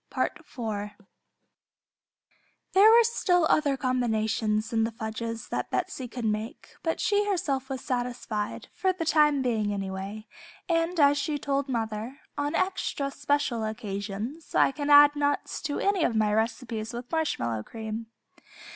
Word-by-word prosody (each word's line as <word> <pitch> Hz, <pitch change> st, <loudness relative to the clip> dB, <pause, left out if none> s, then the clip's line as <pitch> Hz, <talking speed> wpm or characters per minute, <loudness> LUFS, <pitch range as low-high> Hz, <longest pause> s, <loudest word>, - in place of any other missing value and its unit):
There 225 Hz, -, -3 dB, 2.0 s
were 465 Hz, +1 st, +8 dB
still 360 Hz, -7 st, +2 dB
other 285 Hz, -3 st, +2 dB
combinations 220 Hz, -4 st, 0 dB
in 225 Hz, 0 st, +3 dB
the 225 Hz, -, +1 dB
fudges 225 Hz, 0 st, -5 dB
that -, -, -2 dB
Betsey 255 Hz, -, -2 dB
could 245 Hz, -1 st, -5 dB
make, 220 Hz, +6 st, -3 dB
but 325 Hz, -, -1 dB
she 410 Hz, 0 st, +2 dB
herself 285 Hz, -9 st, -1 dB
was 265 Hz, -1 st, -4 dB
satisfied, 245 Hz, -4 st, -3 dB
for 375 Hz, -1 st, +1 dB
the 345 Hz, -3 st, -4 dB
time 300 Hz, -3 st, +4 dB
being, 220 Hz, -4 st, 0 dB
anyway, 195 Hz, +2 st, -5 dB, 0.4 s
and 335 Hz, 0 st, +1 dB
as 285 Hz, 0 st, +5 dB
she 300 Hz, 0 st, -1 dB
told 280 Hz, -1 st, -1 dB
mother, 225 Hz, +1 st, -3 dB, 0.2 s
"On 290 Hz, +2 st, -1 dB
extra 335 Hz, -7 st, -1 dB
special 285 Hz, -5 st, 0 dB
occasions 215 Hz, +6 st, -5 dB
I -, -, +5 dB
can 290 Hz, +1 st, -4 dB
add 290 Hz, 0 st, +8 dB
nuts 290 Hz, 0 st, -1 dB
to 290 Hz, -, -2 dB
any 395 Hz, -4 st, +2 dB
of 235 Hz, -, +1 dB
my 215 Hz, -1 st, +2 dB
recipes 225 Hz, 0 st, -2 dB
with 240 Hz, +1 st, -7 dB
marshmallow 120 Hz, -, -1 dB
cream." 220 Hz, -, -6 dB
250 Hz, 140 wpm, -27 LUFS, 220-290 Hz, 2.0 s, were